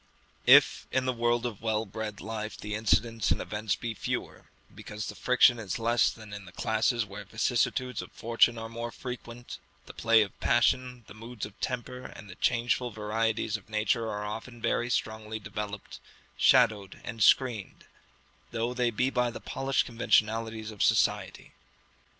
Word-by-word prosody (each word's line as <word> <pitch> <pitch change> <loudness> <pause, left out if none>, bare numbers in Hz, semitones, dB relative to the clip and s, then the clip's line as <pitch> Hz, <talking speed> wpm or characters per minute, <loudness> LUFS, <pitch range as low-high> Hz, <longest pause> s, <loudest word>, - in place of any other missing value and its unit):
If - - +6
in 130 -1 +1
the 130 - +1
world 120 0 +1
of 110 -4 -4
well 110 -1 0
bred 105 0 -6
life 110 0 -5
the 105 0 -6
incidents 110 0 +1
and - - +2
events 105 0 -2
be 120 -1 -4
fewer, - - -4 0.3
because 105 -1 -7
the - - -5
friction 125 -1 +4
is 105 -4 -3
less 115 +1 +3
than 110 -2 -10
in 100 -1 -7
the 85 - -12
classes 110 +3 +1
where 100 0 -8
vicissitudes 125 -3 0
of - - -11
fortune 115 +1 +2
are 115 0 -5
more 115 +1 -5
frequent, 120 -1 -8 0.3
the - - -11
play 115 -1 +4
of 100 - -10
passion, 125 +1 +2
the - - -12
moods 115 0 -7
of 105 - -11
temper, 125 0 -4
and 105 - -10
the - - -14
changeful 120 +1 +1
varieties 110 0 -1
of - - -19
nature 110 +1 0
are 105 -1 -4
often 115 +3 -6
very 120 +1 0
strongly 110 -2 -2
developed, 105 -1 -6 0.4
shadowed 100 -3 +3
and 110 +1 -6
screened 115 -3 +2 0.6
though 120 +1 -2
they 125 -1 +1
be 125 +4 0
by 125 -2 +1
the 115 - -7
polished 135 0 -1
conventionalities 110 -1 +1
of 105 - -8
society. - - +1
115 Hz, 165 wpm, -29 LUFS, 105-120 Hz, 0.6 s, If